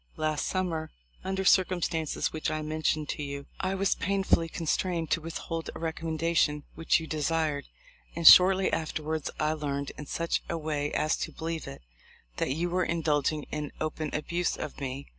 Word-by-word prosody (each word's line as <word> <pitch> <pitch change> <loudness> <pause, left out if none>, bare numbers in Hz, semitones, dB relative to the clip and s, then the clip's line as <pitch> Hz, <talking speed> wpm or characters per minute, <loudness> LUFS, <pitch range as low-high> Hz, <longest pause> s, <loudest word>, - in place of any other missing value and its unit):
Last 155 -1 0
sum 185 -1 0
mer, 160 -1 -3 0.3
under 190 0 -2
circumstances 175 -4 +2
which 155 - -1
I 155 0 -2
mentioned 155 0 0
to - - -3
you, 140 -1 -5
I 190 0 -1
was 195 0 +2
painfully 195 -4 +1
constrained 165 0 -1
to 165 - +2
withhold 165 0 -5
a - - -7
recom 160 0 -3
mendation 160 -2 +2
which 165 +2 +2
you 160 - -6
desired, 155 -1 -1 0.5
and 170 0 +3
shortly 190 +1 +8
after 160 -1 -2
wards 155 0 -2
I 155 0 +2
learned, 140 -2 -3
in 150 - -7
such 170 +3 -1
a 170 - -1
way 150 -2 -2
as 155 +1 +2
to - - -3
believe 165 0 -4
it, 70 - -9 0.5
that - - 0
you 170 +6 -1
were 185 +1 +2
indulging 155 -3 0
in 150 -1 -3
open 155 0 -2
abuse 170 +3 -1
of 145 - -6
me. 135 +1 -4
160 Hz, 180 wpm, -29 LUFS, 150-170 Hz, 0.5 s, shortly